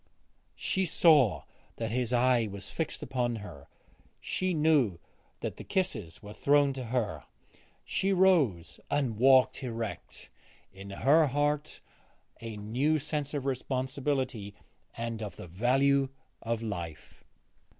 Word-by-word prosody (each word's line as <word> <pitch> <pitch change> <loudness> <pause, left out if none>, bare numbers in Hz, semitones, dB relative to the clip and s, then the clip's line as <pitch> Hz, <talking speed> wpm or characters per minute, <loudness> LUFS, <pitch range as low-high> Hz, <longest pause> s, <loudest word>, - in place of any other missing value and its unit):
She 190 - -1
saw 150 - +4 0.3
that 115 -2 -3
his 125 0 -1
eye 125 -2 +3
was 100 0 -8
fixed 160 - -3
upon 120 -2 -1
her; 85 -10 -9 0.5
she 185 0 -2
knew 150 - +3 0.4
that - - -4
the - - -8
kisses 120 - -3
were 105 0 -9
thrown 145 +2 +3
to 130 -2 -6
her. 110 - -2 0.6
She 195 - 0
rose 160 - +3
and 130 -7 0
walked 130 0 +5
erect, 115 -4 -6 0.4
in 95 +1 -10
her 145 +10 +4
heart 145 +2 -1 0.6
a 115 -2 -6
new 125 +10 +1
sense 150 0 -3
of 140 -2 -3
responsibility 130 -4 -2 0.4
and 115 -1 -4
of 105 -2 -5
the - - -9
value 135 +9 +2 0.3
of 115 0 -2
life. 85 -8 -6
125 Hz, 125 wpm, -30 LUFS, 110-145 Hz, 0.6 s, walked